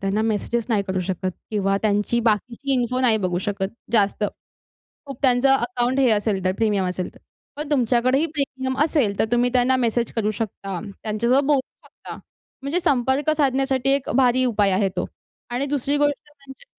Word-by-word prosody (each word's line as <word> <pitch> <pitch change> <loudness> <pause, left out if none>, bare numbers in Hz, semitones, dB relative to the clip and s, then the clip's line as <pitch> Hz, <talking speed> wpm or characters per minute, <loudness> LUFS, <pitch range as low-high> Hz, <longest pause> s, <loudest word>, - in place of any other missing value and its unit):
त्यांना 195 +2 0
मेसेजेस 225 +1 -1
नाही 215 -4 +1
करू 190 -1 -1
शकत 185 0 -2 0.2
किंवा 195 -2 +1
त्यांची 210 +3 +1
बाकीची 240 +6 -1
इन्फो 255 0 0
नाही 240 -4 +4
बघू 180 -1 -1
शकत 195 -1 -2 0.2
जास्त. 210 -1 +2 0.8
खूप 275 -3 -8
त्यांचं 255 0 +4
अकाउंट 245 +1 -1
हे 255 -3 +4
असेल 205 -3 0
तर 185 - +2
प्रीमियम 210 -3 +1
असेल 180 0 -3
तर. - - -17 0.4
पण 300 0 -5
तुमच्याकडेही 255 +2 +2
प्रीमियम 265 -4 -3
असेल 265 -11 0
तर - - +3
तुम्ही 240 +1 +3
त्यांना 255 +1 +3
मेसेजेस 235 -1 -1
करू 215 -2 0
शकता. 195 -3 -5 0.2
त्यांच्यासोबत 235 +6 +1
बोलू 285 -2 +3 0.3
शकता. - - -11 0.5
म्हणजे 290 +6 -1
संपर्क 265 0 +1
साधण्यासाठी 270 -2 +1
एक 275 -1 -3
भारी 255 -1 +3
उपाय 210 -5 +2
आहे 195 +1 +2
तो - - -1 0.4
आणि 250 +3 -1
दुसरी 285 0 -1
गोष्ट 290 0 -1
म्हणजे 275 - -14
245 Hz, 170 wpm, -22 LUFS, 210-270 Hz, 0.8 s, नाही